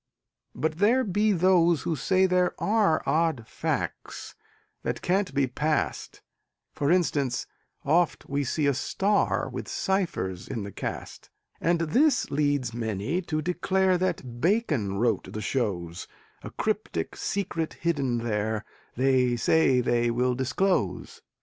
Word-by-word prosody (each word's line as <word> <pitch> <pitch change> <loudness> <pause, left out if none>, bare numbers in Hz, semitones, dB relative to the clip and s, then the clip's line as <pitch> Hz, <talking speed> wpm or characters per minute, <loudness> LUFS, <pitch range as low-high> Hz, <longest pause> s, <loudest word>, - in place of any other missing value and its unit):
But 160 +1 -2
there 235 +6 +4
be 210 0 +1
those 175 -4 +3
who 165 - -1
say 185 +7 +2
there 180 -1 +2
are 205 -7 +2
Odd 160 -7 +1
facts - - -4 0.5
that - - -3
can't 190 -2 +1
be 140 0 +2
passed: 150 +5 -2 0.5
For 140 - -1
instance, 145 -8 +1 0.4
oft 165 +4 +1
we 140 +1 -1
see 145 +3 -1
a 140 - +3
star 200 +10 0
With - - -6
ciphers 170 - -2
in 110 - -4
the 100 - -7
cast - - -6 0.3
And 170 0 +1
this 245 - +2
leads 145 -4 0
many 115 - -2
to 155 -3 -3
declare 185 +2 +1
That 125 -10 -3
Bacon 155 - +1
wrote 115 +2 0
the 110 - -4
shows; 95 -8 -2 0.3
A - - -7
cryptic 80 -1 -2
secret 165 -5 -2
hidden 140 -7 0
there 110 -1 -1 0.3
They 130 -1 +2
say 130 0 +3
they 120 -1 +1
will 125 +2 +1
disclose. 130 - -1
150 Hz, 130 wpm, -27 LUFS, 120-180 Hz, 0.5 s, there